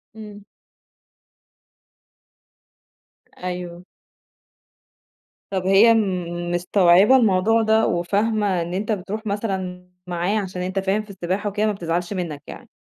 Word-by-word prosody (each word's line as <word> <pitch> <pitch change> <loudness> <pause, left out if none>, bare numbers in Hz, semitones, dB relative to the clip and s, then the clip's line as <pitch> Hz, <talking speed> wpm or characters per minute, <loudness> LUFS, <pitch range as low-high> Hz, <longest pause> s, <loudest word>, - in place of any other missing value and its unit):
إمم. 210 -2 -11 3.0
أيوه 180 -1 -6 1.7
طَب 190 -2 -2
هي 200 +5 +6
م 175 -5 -2
مستوعبة 180 +5 +4
الموضوع 225 -1 +3
ده 220 0 +3
وفاهمة 200 +2 0
إن 170 +1 -5
أنت 205 +4 -2
بتروح 210 +2 -4
مثلًا 190 -4 -4 0.2
معايا 180 +4 -1
عشان 185 -2 -5
أنت 185 +2 -2
فاهم 195 +2 0
في 215 - -19
السباحة 195 +2 -3
وكده 210 +2 -1
ما 215 - +2
بتزعلش 175 -1 -3
منّك 165 -6 -5
يعني؟ - - -11
190 Hz, 110 wpm, -22 LUFS, 180-210 Hz, 3.0 s, هي